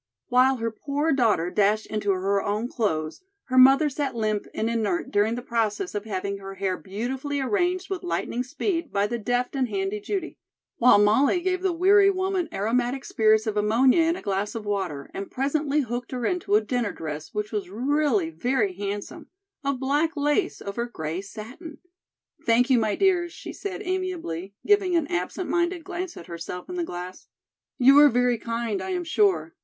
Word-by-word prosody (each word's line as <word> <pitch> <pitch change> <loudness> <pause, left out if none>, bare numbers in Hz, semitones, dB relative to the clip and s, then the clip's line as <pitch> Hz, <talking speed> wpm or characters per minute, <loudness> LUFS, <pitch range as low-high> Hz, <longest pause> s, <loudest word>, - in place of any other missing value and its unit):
While 255 +1 +4
her 230 -2 -2
poor 285 +7 -1
daughter 215 -10 +2
dashed 210 +1 +2
into 210 -1 -3
her 195 +1 +1
own 210 +4 -1
clothes, 160 - -2 0.2
her 255 - -2
mother 270 +4 +7
sat 280 -2 -3
limp 215 -2 -1
and 220 - -2
inert 235 +7 -1
during 215 +1 +2
the 245 - -6
process 220 -6 -1
of 205 0 -4
having 200 -1 -3
her 195 0 -8
hair 190 -1 -1
beautifully 260 +10 -4
arranged 360 +5 0
with 385 -2 -4
lightning 300 -8 -2
speed 330 +5 -2
by 200 0 +1
the 235 +3 -3
deft 245 +4 -1
and 260 -3 0
handy 195 0 -2
Judy, 360 - -4 0.4
while 245 -3 +6
Molly 220 - +4
gave 370 +1 -1
the 380 -1 +1
weary 395 +4 +5
woman 375 -3 -1
aromatic 245 +6 -1
spirits 220 0 +3
of 215 -2 -2
ammonia 235 +8 +4
in 330 +1 +2
a - - -9
glass 200 +2 -2
of 220 -2 -5
water 185 -9 -3
and 195 - -5
presently 290 +2 0
hooked 245 -1 -4
her 250 -2 -2
into 360 - 0
a 215 - +5
dinner 230 -1 -1
dress 155 -2 -6
which 210 0 -3
was 205 -4 -3
really 245 - +1
very 210 +3 0
handsome, 200 +2 -5 0.4
of 280 -2 -1
black 295 +5 0
lace 295 +6 0
over 235 +4 -3
gray 160 -5 -4
satin. 245 - -10 0.7
"Thank 245 +3 +3
you, 250 - +5
my 215 -2 0
dears," 355 -3 +2
she - - -8
said 400 0 -5
amiably, 340 - -3
giving 400 -3 +3
an 330 -3 +2
absent 180 - -2
minded 345 0 0
glance 360 -1 -5
at 170 - -9
herself 170 +1 -7
in - - -5
the 350 - -1
glass. 180 - -7 0.5
"You 270 +2 +7
are 295 0 +8
very 245 -1 +2
kind, 230 -3 -2
I - - -5
am 360 -1 -1
sure. 390 +4 +1
245 Hz, 185 wpm, -25 LUFS, 205-315 Hz, 0.7 s, are